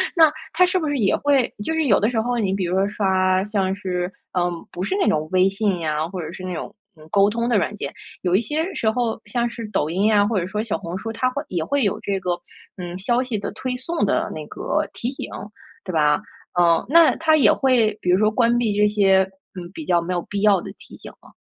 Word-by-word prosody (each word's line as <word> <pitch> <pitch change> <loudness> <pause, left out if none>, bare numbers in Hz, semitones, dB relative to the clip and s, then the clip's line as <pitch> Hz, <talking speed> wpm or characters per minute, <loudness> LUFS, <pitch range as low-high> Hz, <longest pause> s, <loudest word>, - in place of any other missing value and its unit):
那 320 -3 +6 0.2
它 365 +3 +5
是 365 +1 0
不 315 - -2
是 290 - -1
也 200 -5 +2
会 275 -3 +1
就 320 - -2
是 320 -2 +1
有 205 -7 +4
的 215 - +2
时 230 -3 -1
候， 245 +1 -1
你 195 -4 0
比 195 -2 -1
如 175 +1 -1
说 195 +1 +2
刷 190 -2 +1
像 195 -3 0
是， 180 -2 -3 0.3
嗯 175 0 +2 0.2
不 180 - -5
是 380 - -1
那 - - +2
种 155 0 +1
微 185 +1 +4
信 195 -2 0
呀， 155 -1 -1
或 185 -1 -6
者 155 - -6
是 185 - -9
那 185 - -4
种， 165 - -6 0.2
嗯， 155 0 -15
沟 200 0 +4
通 235 +2 -1
的 235 -4 +3
软 205 - -1
件， - - -5 0.3
有 180 0 +1
一 200 - +4
些 315 - -2
时 220 - +1
候 235 -1 -1
像 235 +3 -1
是 230 -1 -7
抖 155 -7 0
音 190 +5 0
呀， 210 -2 +4
或 215 -3 0
者 180 - -3
说 210 +3 -2
小 225 -7 -2
红 170 +3 -6
书， 225 +3 -5
它 255 +3 0
会 285 +4 -4
也 175 -3 -2
会 280 - 0
有 205 +1 0
这 200 -2 -2
个， 180 -1 -2 0.5
嗯， 180 -1 -6
消 240 +5 +1
息 245 -4 -3
的 - - -4
推 255 -1 -3
送 330 +6 -1
的 - - 0
那 - - -6
个 - - -2
提 240 - -3
醒， 270 - -6 0.5
对 185 - -6
吧？ 150 -2 +3 0.4
嗯， 170 -1 +4
那 330 +2 +6
它 315 -1 +3
也 280 - +6
会 235 -6 +2
比 180 - -2
如 180 - +5
说 215 +2 +3
关 235 +1 +2
闭 225 -4 0
这 210 0 +4
些， 195 -2 +4 0.4
嗯， 175 -2 -7
比 315 - -7
较 175 -1 +2
没 175 +2 -3
有 175 - -1
必 200 -1 -4
要 200 -4 +4
的 - - -8
提 - - -14
醒 - - -11
吗？ - - -18
205 Hz, 275 characters per minute, -22 LUFS, 185-240 Hz, 0.5 s, 那